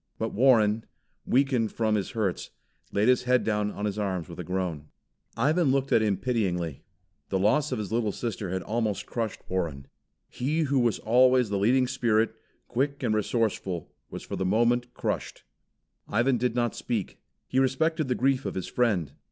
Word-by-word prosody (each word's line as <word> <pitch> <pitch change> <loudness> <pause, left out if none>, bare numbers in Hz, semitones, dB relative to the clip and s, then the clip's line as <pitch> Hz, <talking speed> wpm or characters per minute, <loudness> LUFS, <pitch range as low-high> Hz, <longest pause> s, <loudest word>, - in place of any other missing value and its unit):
But 110 0 -3
Warren, 110 -3 +4 0.4
weakened 125 -4 +2
from, 110 -2 +1
his 100 -3 0
hurts, 100 -5 -1 0.4
laid 105 +3 +2
his 125 0 +3
head 125 0 +3
down 105 -1 0
on 105 0 -4
his 105 0 -2
arms 95 -5 -2
with 85 0 -10
a - - -3
groan. 90 -4 -3 0.5
Ivan 150 +6 +2
looked 135 0 0
at 115 - +5
him 105 -3 +1
pityingly. 90 - -1 0.5
The 95 - +1
loss 110 +11 +2
of 130 - -1
his 105 -1 -4
little 115 -2 +1
sister 105 -3 -4
had 95 +1 -2
almost 110 -3 -1
crushed 115 -4 -3
Warren. 80 -7 -2 0.4
He 150 +6 -1
who 140 -3 +2
was 120 -3 +2
always 125 0 +4
the 100 - 0
leading 125 +6 +3
spirit, 115 -4 +1 0.3
quick 140 +2 -1
and 115 -3 +1
resourceful, 105 -5 -1 0.2
was - - -7
for - - -5
the - - -2
moment 120 +5 +2
crushed. - - -3 0.6
Ivan 120 +3 +2
did 125 0 0
not 120 -3 +1
speak. 115 -6 -3 0.3
He 130 - +1
respected 150 +4 +1
the 125 - 0
grief 135 0 +1
of - - -4
his 95 - -3
friend. 100 - 0
115 Hz, 175 wpm, -27 LUFS, 100-125 Hz, 0.6 s, at